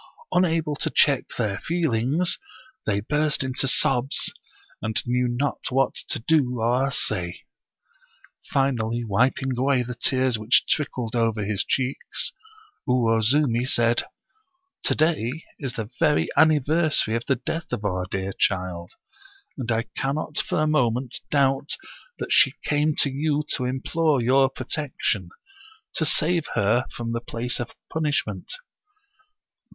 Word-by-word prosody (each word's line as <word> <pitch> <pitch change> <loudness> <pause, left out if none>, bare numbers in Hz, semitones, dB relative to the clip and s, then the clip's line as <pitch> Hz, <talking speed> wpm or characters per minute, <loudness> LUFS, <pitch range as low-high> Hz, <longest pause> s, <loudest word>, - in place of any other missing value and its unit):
Unable 165 -4 +1
to - - 0
check 140 -3 +3
their 105 -5 -1
feelings, 160 0 0 0.5
they 100 -1 +1
burst 150 +5 +1
into 130 0 -1
sobs, 130 0 +1 0.5
and 110 0 0
knew 125 +1 +1
not 125 +4 -1
what 135 0 +2 0.2
to - - 0
do 125 -2 +1
or 125 +4 +2
say. 90 -9 0 1.1
Finally 120 -4 0
wiping 125 +4 +1
away 130 0 +2
the 125 +1 -5
tears 130 -2 +1
which 115 +2 +3
trickled 125 -6 -1
over 115 -3 +1
his 105 -1 -1
cheeks, 130 +1 -2 0.6
Uwoztuni 120 +1 +3
said: 120 0 +3 0.4
" 370 0 -51
Tb"day 155 -2 +1 0.2
is 135 -4 -4
the 110 0 -5
very 150 -3 +3
anniversary 155 -5 +3
of 115 - -3
the 135 - +3
death 165 +7 -5
of 105 - -3
our 90 -2 -1
dear 95 0 -3
child, 90 -3 -1 0.6
and 120 -3 -3
I 115 0 +1
cannot 150 +2 -2
for 155 - 0
a - - +2
moment 130 -4 +1
doubt 135 0 +1 0.4
that - - -5
she - - +5
came 150 +1 +1
to 140 - +1
you 150 +2 0
to 130 - 0
implore 140 +3 +1
your 130 +3 +4
protection, 130 - -2 0.6
to 160 - +1
save 165 +1 +2
her 110 +5 +2
from 115 -1 -5
the 115 0 -2
place 120 +1 -3
of 120 - -5 0.2
punishment. 155 -2 -1
130 Hz, 135 wpm, -24 LUFS, 115-150 Hz, 1.1 s, she